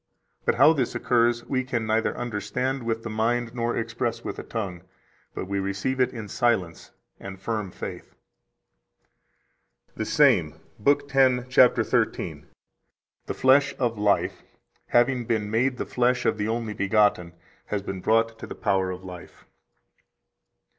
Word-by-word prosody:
But - - +2
how 145 +6 +6
this 130 -6 -1
occurs 120 0 +1
we 130 -1 -1
can 120 -3 -2
neither 110 +1 0
understand 120 +4 -2
with 115 -1 -2
the 115 - -5
mind 115 +2 0
nor 120 -1 -1
express 115 0 -3
with - - -5
the - - -6
tongue, 95 -6 -5 0.5
but - - -4
we 100 0 -1
receive 100 +7 -2
it 125 - +3
in 110 -4 -7
silence 100 -7 -1 0.3
and 95 -1 -9
firm 105 -1 -3
faith." - - -8 1.8
125 - - -29
The 110 - -2
same, 105 - +3 0.3
lib. 145 +2 +3
10, 130 -3 +3
cap. 125 0 +6
13 - - +2 0.3
(p.501): - - -25 0.8
"The - - -2
flesh 140 +2 +4
of 115 -4 -1
life, 105 -1 +1 0.5
having 120 0 +2
been 110 -3 -1
made 125 +3 +1
the - - -3
flesh 125 0 +1
of 110 - +1
the 105 - -1
Only 115 -1 -2
begotten, 100 -4 +1 0.3
has 100 -2 -2
been 95 -2 -5
brought 115 +2 +1
to - - -8
the - - -7
power 95 -2 0
of 90 0 -6
life." 90 -2 -11
115 Hz, 155 wpm, -25 LUFS, 105-125 Hz, 1.8 s, how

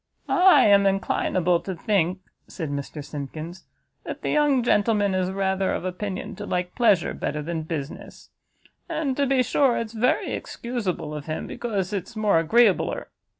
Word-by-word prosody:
"I 370 +1 +6
am 200 -1 +5
inclinable 185 -2 +1
to 190 - -4
think," 185 0 0 0.3
said 160 -6 -5
Mr 140 +1 -5
Simkins, 155 +4 -7 0.4
"that - - -7
the - - -1
young 290 -4 +3
gentleman 210 -3 +2
is 185 -1 0
rather 190 0 0
of - - -3
opinion 185 +1 -4
to 205 -1 -6
like 180 0 -2
pleasure 205 -8 +3
better 150 0 -3
than 165 +1 -3
business; 155 -2 -7 0.6
and, 310 -5 -1
to 280 0 +1
be 260 -1 +3
sure, 260 0 +2
it's 230 -1 -4
very 235 +3 +1
excusable 210 -10 -4
of 150 0 -7
him, 155 - -3
because 205 -5 -3
it's 200 +3 -4
more 205 -6 +2
agreeabler. 225 +3 +2
195 Hz, 155 wpm, -24 LUFS, 170-230 Hz, 0.6 s, I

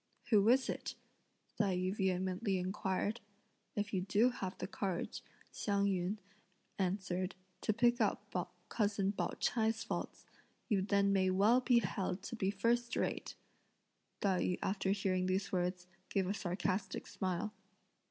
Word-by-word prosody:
"Who 210 0 +6
is 260 +2 +5
it?" - - -3 0.6
Tai 195 -4 +2
yü 185 +2 0
vehemently 190 +1 0
inquired. 190 +4 -1 0.5
"If 210 0 -2
you 185 - +1
do 210 +6 +3
have 190 -6 -4
the - - -3
courage," 190 -2 -3 0.3
Hsiang 200 -1 +1
yün 190 +1 0 0.6
answered, 185 -1 -1 0.3
"to - - +2
pick 240 +2 +3
out 210 -1 +2 0.4
cousin 200 -3 +1
Pao 205 - -2
ch'ai's 225 -1 +1
faults, 230 - -4 0.4
you 205 -5 +2
then 200 0 +3
may 190 -1 +3
well 210 +7 +5
be 245 -2 +4
held 190 -1 -2
to 235 - -5
be 195 -4 0
first 235 +4 +1
rate!" - - -1 0.9
Tai 190 -3 +2
yü 180 - +1
after 195 0 0
hearing 190 -2 +1
these 190 +2 0
words, 180 0 -1 0.2
gave 195 -1 +1
a 195 - +1
sarcastic 190 +1 -2
smile. 190 +3 -2
195 Hz, 140 wpm, -36 LUFS, 185-215 Hz, 0.9 s, Who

